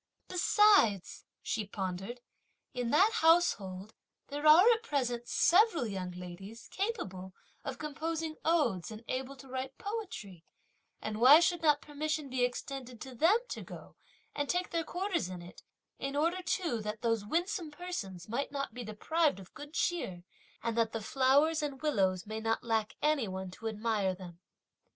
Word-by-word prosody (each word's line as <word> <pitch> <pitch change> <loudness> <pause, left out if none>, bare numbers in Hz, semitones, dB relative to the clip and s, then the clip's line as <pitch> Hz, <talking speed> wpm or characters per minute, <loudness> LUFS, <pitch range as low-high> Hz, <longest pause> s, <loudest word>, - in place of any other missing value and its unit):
"Besides," 365 - +3 0.2
(she 215 -3 -2
pondered), 195 +4 -5 0.5
"in 245 -2 -2
that 380 - +5
household, 215 - +2 0.4
there 290 +2 -1
are 320 +6 +9
at 450 -1 +2
present 245 - -2
several 360 - +4
young 190 -4 -4
ladies, 180 +5 -9
capable 190 - -4 0.3
of - - -5
composing 315 +1 -3
odes, 290 - +1
and 220 +1 -9
able 265 +1 -3
to 270 0 -13
write 260 +1 -5
poetry, 365 - -6 0.6
and 215 +1 -4
why 275 +6 +10
should 345 0 +1
not 300 -2 +3
permission 300 -1 -3
be 255 -1 +1
extended 250 -1 -4
to 260 - -7
them 330 - +4
to - - -5
go - - -11 0.4
and 290 -1 -2
take 360 +1 0
their 335 -1 0
quarters 355 - -2
in 180 -2 -7
it; 175 - -13 0.4
in 275 +1 -3
order 335 +5 +1
too 335 - -1
that 210 +1 -5
those 230 -3 +1
winsome 345 - -1
persons 295 - -6
might 240 +7 -2
not 275 -4 -3
be 245 +1 -6
deprived 285 +6 0
of 190 - -13
good 290 0 -10
cheer, 190 - -1 0.4
and 230 -1 -1
that 230 -1 +1
the 225 -2 -3
flowers 280 +7 +3
and 290 -1 -4
willows 190 -11 +1
may 215 +1 -4
not 225 0 -1
lack 220 -2 0
any 300 -6 +2
one 190 -1 -5
to 225 - -7
admire 210 -3 0
them!" 175 -2 -11
260 Hz, 160 wpm, -32 LUFS, 210-320 Hz, 0.6 s, why